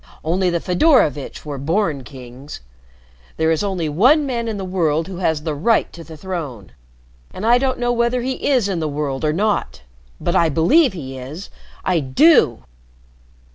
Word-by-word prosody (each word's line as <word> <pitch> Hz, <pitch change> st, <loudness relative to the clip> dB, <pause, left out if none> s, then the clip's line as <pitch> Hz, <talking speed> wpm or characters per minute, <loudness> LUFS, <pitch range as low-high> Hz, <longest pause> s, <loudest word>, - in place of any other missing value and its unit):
Only 180 Hz, +3 st, +1 dB
the 170 Hz, -1 st, 0 dB
Fedorovitch 180 Hz, -, +1 dB
were 145 Hz, -2 st, -5 dB
born 160 Hz, -1 st, -1 dB
kings. 130 Hz, -, -11 dB, 0.8 s
There 160 Hz, 0 st, +2 dB
is 160 Hz, +4 st, 0 dB
only 185 Hz, -5 st, -2 dB
one 250 Hz, -, +3 dB
man 235 Hz, -4 st, -3 dB
in 220 Hz, -2 st, -3 dB
the 195 Hz, -, -5 dB
world 165 Hz, -4 st, 0 dB
who 190 Hz, -2 st, -7 dB
has 160 Hz, -4 st, -1 dB
the 155 Hz, -2 st, -2 dB
right 210 Hz, +10 st, +1 dB
to 170 Hz, -, -10 dB
the 160 Hz, -1 st, -12 dB
throne 150 Hz, -, -6 dB, 0.6 s
and 205 Hz, -, -6 dB
I 240 Hz, +2 st, +5 dB
don't 260 Hz, 0 st, -1 dB
know 245 Hz, 0 st, 0 dB
whether 240 Hz, +1 st, 0 dB
he 260 Hz, +1 st, -3 dB
is 250 Hz, -7 st, +2 dB
in 190 Hz, -4 st, -2 dB
the 155 Hz, -, -2 dB
world 145 Hz, -2 st, -3 dB
or 155 Hz, -, +2 dB
not. 190 Hz, -, -1 dB, 0.4 s
But 175 Hz, -, -2 dB
I 170 Hz, -3 st, +3 dB
believe 230 Hz, -, +3 dB
he 135 Hz, -6 st, -7 dB
is! 150 Hz, +10 st, -9 dB, 0.3 s
I 180 Hz, -3 st, +2 dB
do!" 130 Hz, -, +3 dB
170 Hz, 175 wpm, -19 LUFS, 150-220 Hz, 0.8 s, I